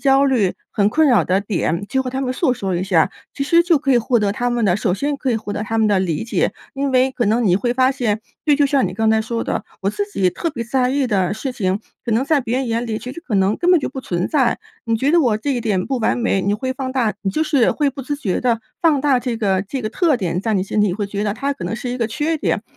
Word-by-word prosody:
焦 275 0 +4
虑 235 -9 +2 0.2
很 205 -1 +2
困 310 +8 +3
扰 225 -9 +5
的 190 +2 +1
点， 195 -2 -1
就 265 0 0
和 255 - -4
他 265 +1 -3
们 255 -1 -1
诉 255 -1 +1
说 190 -4 -3
一 175 - -1
下， 170 -5 +3 0.2
其 275 - -2
实 335 +3 +4
就 335 -4 +3
可 270 0 +1
以 245 - +5
获 240 +1 +1
得 205 -1 +1
他 245 +3 -1
们 240 -2 0
的 180 -3 +3
首 200 -3 0
先 285 +6 -2
可 270 -2 -2
以 225 - +1
获 210 -2 -5
得 210 - -3
他 225 +1 -2
们 220 - +3
的 200 -2 +3
理 170 0 -1
解。 235 - 0 0.2
因 275 0 -1
为 260 +1 +3
可 240 - -1
能 225 +3 +2
你 180 - +4
会 240 +3 0
发 260 +1 +3
现， 225 -5 -1 0.2
对， 295 -2 +4
就 290 - +3
像 275 -2 +2
你 - - -6
刚 220 +1 +2
才 220 0 +3
说 230 +1 -3
的， - - -2 0.2
我 195 - +1
自 410 - -2
己 185 - +1
特 335 - -3
别 235 -6 -5
在 250 +1 +1
意 275 -1 +1
的 195 -4 +1
事 255 +4 -4
情， 195 -5 -1 0.3
可 235 - -3
能 240 +5 +2
在 290 -1 +2
别 245 0 -2
人 265 -1 -1
眼 230 +1 -1
里， 220 -1 -2
其 250 +3 -7
实 335 - -9
可 245 -11 -4
能 195 +2 +2
根 355 +1 +1
本 355 - +6
就 - - -3
不 265 - -6
存 180 -7 -2
在。 270 -6 +2 0.3
你 230 -1 +1
觉 270 +6 +1
得 345 - +5
我 235 -7 +2
这 280 +6 -2
一 245 - -1
点 200 -5 -1
不 265 -2 -1
完 225 - +1
美， 230 -5 +1
你 200 +2 0
会 260 +4 -2
放 260 0 -4
大， 230 -6 +1
你 195 - 0
就 310 - 0
是 275 -6 +3
会 290 -2 +1
不 270 0 -8
自 290 +3 -3
觉 200 -10 -2
的 235 -3 +1 0.2
放 310 -4 +4
大 265 -3 +2
这 245 -2 -2
个 195 -4 +1
这 250 +5 -5
个 215 - -1
特 320 -1 +2
点， 180 -3 -2
在 225 +1 -1
你 185 - +1
心 210 +1 -1
里 205 -3 +2
会 205 +1 -2
觉 200 +1 -3
得 205 - 0
它 280 +4 -1
可 280 - -10
能 - - -2
是 245 +1 -4
一 250 - -4
个 230 - +1
缺 305 +7 -1
点。 - - -1
240 Hz, 325 characters per minute, -20 LUFS, 205-270 Hz, 0.3 s, 本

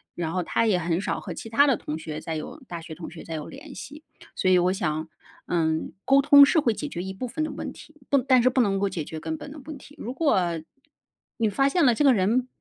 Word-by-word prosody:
然 165 -2 -3
后 185 0 -1
她 230 - +1
也 210 -5 +3
很 170 0 0
少 - - -2
和 185 - -6
其 225 - -8
他 260 +6 +5
的 270 -4 +3
同 150 - -5
学 155 -1 -6
再 160 0 -5
有 155 - -6
大 170 -1 -6
学 160 -1 -9
同 165 +1 -8
学 165 - -10
再 165 - -7
有 150 - -5
联 280 +1 -11
系。 300 +3 -10 0.3
所 185 - +2
以 185 - +6
我 180 +1 +2
想， 155 -5 -2 0.4
嗯， 160 -2 0
沟 275 +1 +5
通 285 0 +9
是 320 - +3
会 240 -6 +2
解 295 - -5
决 175 - -5
一 190 +1 -5
部 250 +7 -5
分 310 +6 -3
的 310 - -3
问 - - -5
题， 310 - -15
不 280 - +4
但 255 -1 +4
是 255 - +5
不 255 - 0
能 200 -4 +1
够 200 0 0
解 165 -5 -4
决 160 - -7
根 160 0 -4
本 285 - -9
的 300 - -9
问 310 -2 -7
题。 285 +2 -15
如 245 -3 -5
果 190 - +1 0.8
你 225 -2 +2
发 275 +7 +2
现 335 0 +3
了 240 - +5
这 295 - +1
个 275 -2 +6
人 230 +5 +1
210 Hz, 290 characters per minute, -25 LUFS, 170-275 Hz, 0.8 s, 通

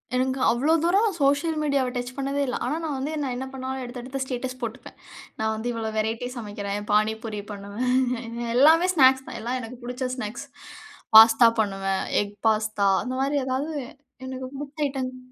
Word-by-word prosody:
எனக்கு 260 +1 0
அவ்ளோ 275 +7 +2
தூரம் 395 +6 +3
சோசியல் 290 +3 +2
மீடியாவ 280 -3 +1
டச் 245 0 -4
பண்ணதே 275 +1 -1
இல்ல. 250 - -1
ஆனா 285 +5 -1
நான் 300 -3 -2
வந்து 280 +4 -3
நான் 260 -3 -2
என்ன 260 +1 -4
பண்ணாலும் 265 0 -4
எடுத்து 245 0 -7
எடுத்து 265 +2 -5
ஸ்டேட்டஸ் 255 0 -4
போட்டுப்பேன். 235 +3 -6 0.4
நான் 220 0 0
வந்து 220 +3 -4
இவ்ளோ 225 -1 -3
வெரைட்டி 225 +3 -1
சமைக்கிறேன். 205 -2 -4
பாணிபூரி 215 0 0
பண்ணுவேன் 235 +3 -2
எல்லாமே 320 +7 +6
ஸ்நாக்ஸ் 265 -3 +5
தான். - - -6
எல்லாம் 245 +3 -2
எனக்கு 240 +2 -9
பிடிச்ச 250 +1 -3
ஸ்நாக்ஸ் 240 +2 -5 0.7
பாஸ்தா 225 +1 +9
பண்ணுவேன் 195 -2 -1 0.2
எக் 205 0 -5
பாஸ்தா 215 -2 +1 0.2
அந்த 255 0 -4
மாதிரி 285 +2 +1
ஏதாவது 265 +4 -2 0.6
எனக்கு 260 0 -5
புடிச்ச 295 +1 -3
ஐட்டங்கள். 255 -2 -4
255 Hz, 165 wpm, -25 LUFS, 225-270 Hz, 0.7 s, பாஸ்தா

